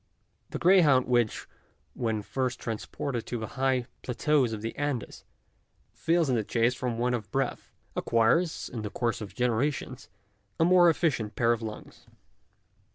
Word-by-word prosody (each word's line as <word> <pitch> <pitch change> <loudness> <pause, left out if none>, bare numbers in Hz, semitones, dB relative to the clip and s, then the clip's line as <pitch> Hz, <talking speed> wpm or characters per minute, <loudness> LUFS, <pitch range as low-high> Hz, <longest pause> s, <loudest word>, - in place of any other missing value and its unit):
The - - -4
greyhound 165 -8 +5
which, 120 -3 0 0.5
when 110 -3 -2
first 125 +2 -2
transported 115 +2 -4
to 120 - -3
the 110 -1 -5
high 130 -2 +1 0.2
plateaus 130 0 +1
of 110 -1 -5
the 115 - -4
Andes, 145 -5 -3 0.7
fails 165 -1 +1
in 130 - +2
the 110 - 0
chase 115 +3 +1
from 125 -2 -3
want 125 +1 +1
of 110 -4 -3
breath, 135 0 -2 0.3
acquires, 120 +9 +1
in 115 - -6
the 105 - -4
course 115 +1 -2
of 105 - -8
generations, 125 +2 -1 0.5
a 165 - +5
more 175 -1 +6
efficient 130 - 0
pair 120 -1 +3
of 120 -1 0
lungs. 110 -1 -9
125 Hz, 155 wpm, -28 LUFS, 115-140 Hz, 0.7 s, more